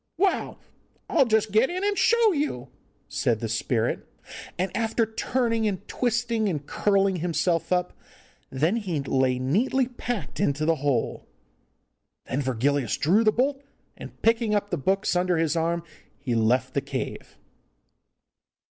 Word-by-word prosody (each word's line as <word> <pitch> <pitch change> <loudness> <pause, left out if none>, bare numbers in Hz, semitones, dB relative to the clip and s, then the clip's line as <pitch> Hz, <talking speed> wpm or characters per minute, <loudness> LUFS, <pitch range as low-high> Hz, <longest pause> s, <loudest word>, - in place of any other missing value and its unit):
'Well, 385 +2 0 0.5
I'll 275 -6 +3
just 220 -1 +2
get 220 +5 +4
in 365 +2 -3
and 410 0 +1
show 445 +3 +4
you,' 280 - -2 0.4
said 115 -2 0
the 115 - -3
spirit, 115 +1 -1 0.5
and 185 0 -2
after 225 0 +1
turning 230 0 0
and 200 0 -4
twisting, 235 -3 0
and 150 -5 -3
curling 195 0 +1
himself 170 0 0
up, 180 0 +1 0.6
then 155 - +1
he 185 -9 -2
lay 130 -2 +1
neatly 225 - +1
packed 245 -3 -5
into 155 -5 +1
the 165 0 +2
hole. 140 -5 -1 1.0
Then 135 - -2
Virgilius 130 -1 0
drew 195 +9 +3
the 215 - +4
bolt, 275 +4 0 0.3
and, - - -11
picking 225 -2 +3
the - - +1
books 190 +7 0
up - - +4
under 180 -1 +1
his 160 0 +1
arm, 170 +1 0 0.3
he 135 -3 -3
left 115 +3 +1
the 140 - 0
cave. 135 -1 -6
185 Hz, 145 wpm, -25 LUFS, 140-230 Hz, 1.0 s, get